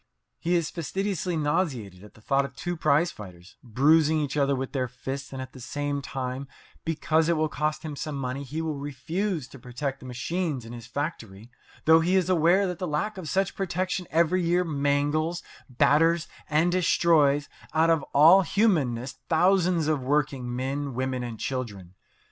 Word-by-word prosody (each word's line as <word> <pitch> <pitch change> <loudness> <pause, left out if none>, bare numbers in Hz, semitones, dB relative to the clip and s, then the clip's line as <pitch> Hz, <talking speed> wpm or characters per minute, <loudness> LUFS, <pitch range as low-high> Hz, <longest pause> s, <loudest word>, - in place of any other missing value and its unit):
He 175 +2 0
is 170 -2 0
fastidiously 180 +1 -2
nauseated 145 - -1
at 105 - -15
the 110 - -18
thought 140 +5 +2
of 140 - -7
two 175 0 -3
prize 165 +2 +2
fighters 90 -2 -12
bruising 150 +6 +3
each 145 -2 -2
other 140 -1 +2
with 130 0 -4
their 130 -2 -1
fists; 135 +3 -6
and 135 - -6
at 130 -1 -7
the 130 - -11
same 145 +3 -3
time, 135 0 -4 0.4
because 160 0 +1
it 170 - +2
will 155 0 +2
cost 150 0 -2
him 155 -2 -5
some 150 +1 -4
money, 135 0 -3
he 150 +4 -4
will 155 -3 -3
refuse 150 +4 -3
to 135 - -12
protect 135 +3 -4
the 130 - -11
machines 135 +2 -3
in 115 - -9
his 120 -1 -9
factory, 120 -6 -5 0.3
though 160 +1 +7
he 175 +3 +1
is 185 -1 +2
aware 175 +3 +4
that 180 -2 -4
the 180 - -2
lack 185 +7 -2
of 160 -5 -6
such 195 0 0
protection 185 -1 -2
every 170 +3 +2
year 175 +2 +2
mangles, 145 +2 0 0.3
batters, 165 +6 +3 0.2
and 160 +3 +3
destroys 160 -5 +3 0.3
out 165 +1 +4
of 165 -2 +3
all 165 +7 +7
humanness 150 - +1
thousands 175 -1 +3
of 155 -3 +1
working 130 -2 -1
men, 135 +1 -3
women, 130 0 -2
and 120 -3 -6
children. 105 -9 -5
150 Hz, 175 wpm, -26 LUFS, 130-170 Hz, 0.4 s, though